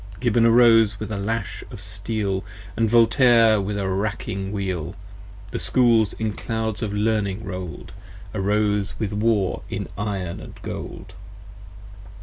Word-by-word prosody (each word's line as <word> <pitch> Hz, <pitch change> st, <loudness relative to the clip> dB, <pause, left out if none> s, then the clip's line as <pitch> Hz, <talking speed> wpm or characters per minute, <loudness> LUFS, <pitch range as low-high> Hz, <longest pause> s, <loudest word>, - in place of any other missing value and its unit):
Gibbon 120 Hz, -1 st, +3 dB
arose 115 Hz, -3 st, +5 dB
with 110 Hz, 0 st, -5 dB
a 105 Hz, -, -2 dB
lash 105 Hz, +1 st, -3 dB
of 120 Hz, -, -9 dB
steel, 100 Hz, 0 st, -2 dB
60 -, -, -16 dB, 0.3 s
And 115 Hz, -1 st, +1 dB
Voltaire 115 Hz, -1 st, +5 dB
with 100 Hz, +1 st, -3 dB
a 100 Hz, -1 st, -1 dB
wracking 95 Hz, 0 st, -2 dB
wheel: 95 Hz, -4 st, -3 dB, 0.6 s
The -, -, -3 dB
Schools 115 Hz, -5 st, +3 dB
in 110 Hz, -1 st, -2 dB
clouds 110 Hz, -1 st, -3 dB
of 110 Hz, -3 st, -2 dB
learning 105 Hz, -1 st, 0 dB
roll'd 90 Hz, -2 st, -6 dB, 0.4 s
Arose 105 Hz, 0 st, 0 dB
with 105 Hz, -2 st, -2 dB
War 105 Hz, -3 st, +1 dB
in -, -, -4 dB
iron 95 Hz, -4 st, -4 dB
& -, -, -18 dB
gold. -, -, -7 dB
105 Hz, 135 wpm, -23 LUFS, 100-115 Hz, 0.6 s, arose